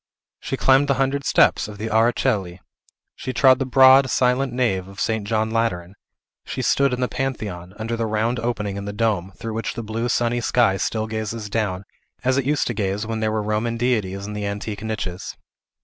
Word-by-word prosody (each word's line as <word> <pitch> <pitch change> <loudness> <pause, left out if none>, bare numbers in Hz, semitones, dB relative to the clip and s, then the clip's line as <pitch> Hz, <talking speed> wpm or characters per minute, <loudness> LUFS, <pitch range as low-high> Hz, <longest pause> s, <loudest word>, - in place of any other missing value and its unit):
She - - -4
climbed 135 +2 +4
the 140 - +2
hundred 135 +1 0
steps - - +3
of 105 -1 -9
the 110 +2 -4
Ara 115 +2 +4
Coeli; 95 -6 -1 0.6
she 130 - -5
trod 130 -1 +5
the 135 - -1
broad, 130 +1 +6
silent 125 +2 +2
nave 115 -7 0
of 100 0 -12
St. 110 -2 -1
John 110 0 0
Lateran; 95 -6 -1 0.5
she - - -4
stood 140 -1 +3
in 125 0 -2
the 125 - +2
Pantheon, 105 -10 -4
under 115 +2 -3
the 115 -1 -1
round 110 +3 0
opening 105 -4 -2
in 100 - -5
the 100 - -5
dome, 105 -4 0
through 115 -1 -6
which 115 +1 -3
the 115 - -4
blue 115 +3 -3
sunny 120 0 +1
sky 115 -4 +2
still 110 +2 -1
gazes 110 -1 -4
down, 100 -4 -1 0.4
as 130 +1 +2
it 135 - -2
used 145 +1 +1
to - - -2
gaze 100 0 -2
when 110 0 -3
there 110 0 0
were 110 -1 -1
Roman 110 +2 -1
deities 105 -5 -1
in 105 - -6
the 105 -1 -3
antique 100 +1 -5
niches. 105 -5 -5
110 Hz, 205 wpm, -22 LUFS, 105-125 Hz, 0.6 s, broad